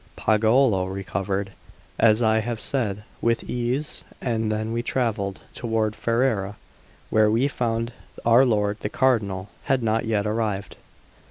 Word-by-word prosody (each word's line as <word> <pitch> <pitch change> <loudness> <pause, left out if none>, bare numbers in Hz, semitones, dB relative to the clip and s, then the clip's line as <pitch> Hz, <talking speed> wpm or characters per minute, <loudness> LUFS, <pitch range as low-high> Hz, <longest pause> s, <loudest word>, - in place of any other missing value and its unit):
Pagolo 110 -2 +3
recovered, 95 +1 -3 0.5
as 110 +1 +5
I 110 0 +4
have 115 0 -3
said, 105 -7 -1 0.2
with 115 0 +1
ease; 125 +5 -2 0.2
and 110 -3 -1
then 110 +1 -2
we 115 - 0
travelled 110 -6 -1
toward 110 -2 -1
Ferrara, 115 -4 0 0.6
where 110 -1 +4
we 115 +6 +3
found 115 -3 -2 0.3
our 120 +3 +6
lord 105 -4 +1
the 105 - -3
Cardinal 105 -8 +1 0.2
had 130 -2 +1
not 115 +1 +1
yet 110 -2 0
arrived. 105 -2 -2
110 Hz, 135 wpm, -24 LUFS, 105-120 Hz, 0.6 s, our